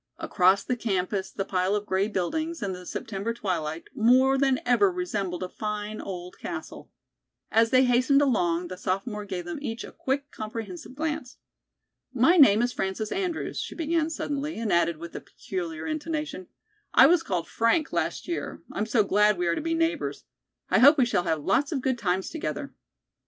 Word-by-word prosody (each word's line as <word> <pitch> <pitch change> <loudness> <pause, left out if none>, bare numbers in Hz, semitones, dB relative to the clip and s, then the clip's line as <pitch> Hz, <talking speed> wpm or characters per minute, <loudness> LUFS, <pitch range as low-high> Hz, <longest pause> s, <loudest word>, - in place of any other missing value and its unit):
Across 190 +1 +3
the 250 - -1
campus 195 -3 -1
the 195 - -4
pile 185 +1 0
of 210 0 -2
gray 190 +1 +1
buildings, 315 - -2
in 195 - -1
the 180 -1 -9
September 225 -1 -4
twilight, 165 -7 -3
more 255 +4 +4
than 270 -1 +2
ever 250 +11 +4
resembled 205 - -3
a - - -3
fine 210 +1 -4
old 180 -2 -7
castle. - - -7 0.6
As 225 +1 +4
they 255 +1 +5
hastened 255 +3 +4
along, 180 -11 +1
the 185 - -6
sophomore 205 +3 -3
gave 185 -3 -5
them 175 - -5
each 230 -5 -4
a - - -9
quick, 280 +2 -3
comprehensive 215 0 -7
glance. 305 -3 -3 0.8
"My 260 +9 +5
name 235 - +7
is 245 0 0
Frances 195 +3 -3
Andrews," 360 -4 -2
she - - -5
began 325 -1 0
suddenly, 295 -1 -3
and 225 -2 -1
added 170 -1 +2
with 170 +1 -9
a - - -5
peculiar 170 -4 -6
intonation, 310 - -4 0.5
"I 260 - +9
was 335 +3 +5
called 180 - -2
'Frank' 260 +8 +1
last - - -2
year. 345 - -4
I'm 210 +2 -2
so 220 -1 +3
glad 210 0 +3
we 175 - -1
are 170 - +2
to - - -3
be 330 +1 -1
neighbors. 330 +1 -1 0.5
I - - +5
hope 285 +5 +8
we 260 - +4
shall 185 -7 0
have 160 -3 -1
lots 275 - +1
of 295 - 0
good 260 -1 0
times 190 -3 -1
together." 320 - -4
220 Hz, 185 wpm, -26 LUFS, 185-280 Hz, 0.8 s, I